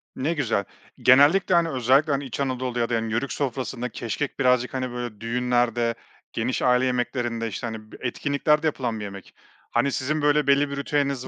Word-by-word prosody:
Ne 150 +6 -1
güzel. 120 -10 0 0.3
Genellikle, 150 +9 +5
hani, 170 -1 +3
özellikle, 135 +3 +3
hani, 140 0 -1
İç 130 - -6
Anadolu 130 -2 -2
ya 115 - 0
da - - -2
Yörük 115 +4 -2
sofrasında 125 -2 -3
keşkek 120 +5 -4
birazcık, 125 -1 +2
hani, 130 -1 -2
böyle, 120 -3 -6
düğünlerde, 120 0 0 0.4
geniş 120 +3 -1
aile 125 0 +3
yemeklerinde, 120 -2 -1
işte, 115 +2 -4
hani, 110 -1 -5 0.2
etkinliklerde 145 +4 +1
yapılan 120 -7 -2
bir - - -5
yemek. 100 -1 -10 0.4
Hani 140 - +2
sizin 150 +4 -1
böyle 145 0 +2
belli 140 +1 +4
bir 140 - -5
ritüeliniz 140 -2 -1
130 Hz, 170 wpm, -24 LUFS, 120-140 Hz, 0.4 s, Genellikle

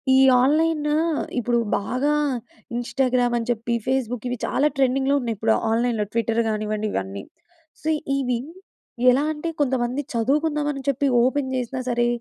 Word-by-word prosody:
ఈ - - +6 0.2
ఆన్‌లైను 300 +2 +2 0.4
ఇప్పుడు 240 0 +1 0.2
బాగా 255 +8 0 0.6
ఇన్‌స్టాగ్రామ్ 245 0 +1
అని 230 - -5
చెప్పి, 235 +1 -2
ఫేస్‌బుక్ 250 -2 -1
ఇవి 245 - -2
చాలా 295 +3 +2
ట్రెండింగ్‌లో 270 +1 +2
ఉన్నాయి 230 -2 -2
ఇప్పుడు, 110 - +2 0.2
ఆన్‌లైన్‌లో 230 -2 +1
ట్విట్టర్ 230 0 +1
కానివ్వండి 215 0 -2
ఇవన్నీ. 95 +1 -4 0.6
సో, 315 - -2 0.3
ఇవి 250 -3 0 0.7
ఎలా 265 +3 +2
అంటే, 310 +2 -4
కొంతమంది 255 -1 0
చదువుకుందాం, 295 +6 +1
అని 275 -1 -7
చెప్పి 280 +1 0 0.2
ఓపెన్ 265 +1 0
చేసినా 255 +1 -3
సరే, 240 0 +2
250 Hz, 140 wpm, -23 LUFS, 235-275 Hz, 0.7 s, ఈ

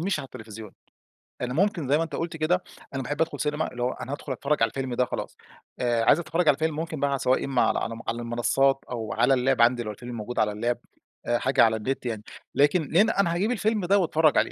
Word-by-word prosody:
مش 180 -1 0
على 140 - -5
التليفزيون، 110 -4 -10 0.7
لإن 125 - -3
ممكن 175 - +1
زي 145 - +4
ما 165 - +1
أنتَ 160 -3 -5
قلت 165 0 -3
كده 175 +4 +1 0.3
أنا 135 - -2
باحب 145 +5 -3
أدخل 165 - -1
سينما، 150 +2 -1
اللي 120 0 -4
هو 125 - +1
أنا 130 - -7
هادخل 145 -1 -6
أتفرّج 140 0 0
على 115 - +3
الفيلم 130 -2 -4
ده 125 +1 +2
خلاص، - - -5 0.4
آآ، 120 -2 +1
عايز 155 - +5
أتفرّج 165 0 -1
على 145 - +6
الفيلم 160 0 -1
ممكن 160 -1 -4
بقى 140 -1 0
سواء 130 +1 +1
إما 135 -3 +1
على - - +2
على 115 0 -4
على 115 - -1
المنصات 120 +4 +1
أو 115 -3 -3
على 135 - +3
اللاب 130 -1 +2
عندي 120 0 +4
لو 105 - -4
الفيلم 120 +3 -8
موجود 115 +3 -4
على 105 - +2
اللاب 120 +4 -1 0.5
آآ 120 0 +1
حاجة 130 0 +3
على 110 -1 +4
النت، 130 +4 -3
يعني 110 -3 -3 0.3
لكن 145 +2 +3
لأن 205 +7 +5
أنا 195 -5 +1
هاجيب 195 +7 0
الفيلم 220 -4 0
ده 195 +3 +4
وأتفرّج 160 -3 +3
عليه، - - +2
135 Hz, 240 wpm, -26 LUFS, 120-160 Hz, 0.7 s, على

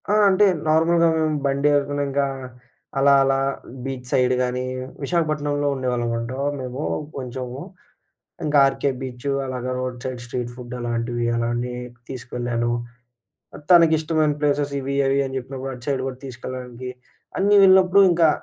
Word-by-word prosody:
ఆ! - - +3 0.2
అంటే 195 +2 +4 0.2
నార్మల్‌గా 165 +2 +4 0.4
బండి 140 +1 +1
ఏసుకునింకా 140 0 -1 0.7
అలా 140 +1 +5
అలా 135 0 +2 0.5
బీచ్ 130 -2 -5
సైడ్ 125 -1 +3
గానీ 125 0 -2 0.4
విశాఖపట్నంలో 145 -2 0
ఉండేవాళ్ళమన్నమాట 125 +1 -2
మేము 130 +2 -5 0.4
కొంచెము 125 0 -5 0.9
ఇంకా 150 -1 +2
'ఆర్‌కే 140 +1 0
బీచు' 130 +1 -3
అలాగ 130 -1 -4
రోడ్ 130 -1 -4
సైడ్ 130 -2 -4
స్ట్రీట్ 125 -1 -4
ఫుడ్ 125 -1 -9
అలాంటివి 120 0 -2
అలానే 120 +1 -1 0.3
తీసుకెళ్ళాను. 120 -2 -2 1.0
తనకిష్టమైన 160 -3 +4
ప్లేసెస్ 145 -1 +1
ఇవి 135 +1 -3
అవి 135 +1 +2
అని 135 0 -5
చెప్పినప్పుడు 130 +1 -6
అటు 125 -1 -10
సైడ్ 135 -2 0
కూడా 130 -1 -5
తీసుకెళ్లడానికి 125 0 -7 0.5
అన్నీ 200 +2 +3
ఎళ్ళినప్పుడు 190 0 +6
ఇంకా 170 -2 +4
130 Hz, 125 wpm, -22 LUFS, 125-145 Hz, 1.0 s, ఎళ్ళినప్పుడు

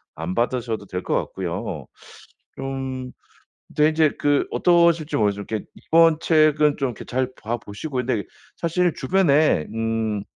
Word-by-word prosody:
안 80 +3 -4
받으셔도 115 -2 -2
될 90 0 -4
것 - - -2
같고요. 90 - -4 0.7
좀 135 -1 -4 0.6
근데 150 +1 +4
이제 155 -1 +3
그 145 -1 +2
어떠실지 170 -3 +3
모르지만 100 -2 0
이렇게 110 -2 -3
이번 165 -1 +4
책은 155 -2 +3
좀 135 -2 0
이렇게 120 - -9
잘 130 +1 -2
봐 115 +3 -2
보시고 120 +7 -8
근데 125 -4 0 0.3
사실 175 0 +1
주변에 150 - +3
음 115 -2 -1
130 Hz, 280 characters per minute, -23 LUFS, 110-155 Hz, 0.7 s, 근데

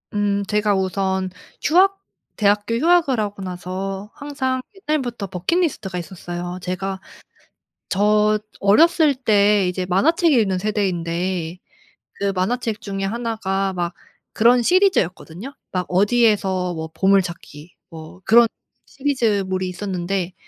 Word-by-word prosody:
음 200 -1 +1
제가 210 -1 +1
우선 190 0 -1 0.3
휴학 385 +5 +3 0.4
대학교 205 +2 +1
휴학을 325 -2 +3
하고 205 -1 -3
나서 190 +2 -5
항상 265 -3 -2 0.3
옛날부터 245 -9 -1
버킷리스트가 190 - -1
있었어요. 175 +1 -6
제가 190 +1 -3 0.9
저 210 +2 +3 0.2
어렸을 305 - +4
때 205 -5 +3
이제 180 0 -3
만화책 310 - +3
읽는 205 -7 +2
세대인데 180 -3 -2 0.6
그 200 0 0
만화책 220 +3 -1
중에 195 -1 -4
1 230 +3 -2
가 195 -2 -1
막 175 -1 -3 0.4
그런 240 +3 +5
시리즈였거든요. 265 - +1 0.2
막 180 -1 -1
어디에서 195 -3 +2
뭐 160 0 -5
보물찾기. 175 -5 0 0.2
뭐 160 +3 -11
그런 235 +1 +7 0.4
시리즈물이 210 -9 -1
있었는데 180 -1 -3
200 Hz, 265 characters per minute, -21 LUFS, 185-230 Hz, 0.9 s, 그런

